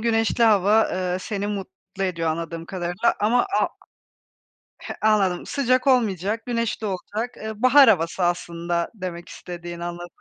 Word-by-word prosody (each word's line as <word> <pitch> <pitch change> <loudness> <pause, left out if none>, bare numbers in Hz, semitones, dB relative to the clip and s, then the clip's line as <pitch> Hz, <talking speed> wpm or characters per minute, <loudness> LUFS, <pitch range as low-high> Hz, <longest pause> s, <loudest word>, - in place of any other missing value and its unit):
güneşli 225 +1 +2
hava, 215 0 +4
eee, 180 -1 -1
seni 205 +1 -3
mutlu 195 -1 -6
ediyor 170 -3 -1
anladığım 165 +1 -4
kadarıyla 180 +4 -1
ama 225 +4 +3
a 390 0 0 1.1
He, - - -6
anladım, 200 -5 +2
sıcak 255 -1 +1
olmayacak, 220 -3 +1
güneşli 230 -2 -2
olacak. 210 +5 -4
Eee, 220 0 -7
bahar 260 +1 +7
havası 175 -2 +1
aslında 170 0 -1
demek 180 -2 -6
istediğin 175 -1 -8
anladığım 175 0 -5
195 Hz, 135 wpm, -23 LUFS, 175-225 Hz, 1.1 s, bahar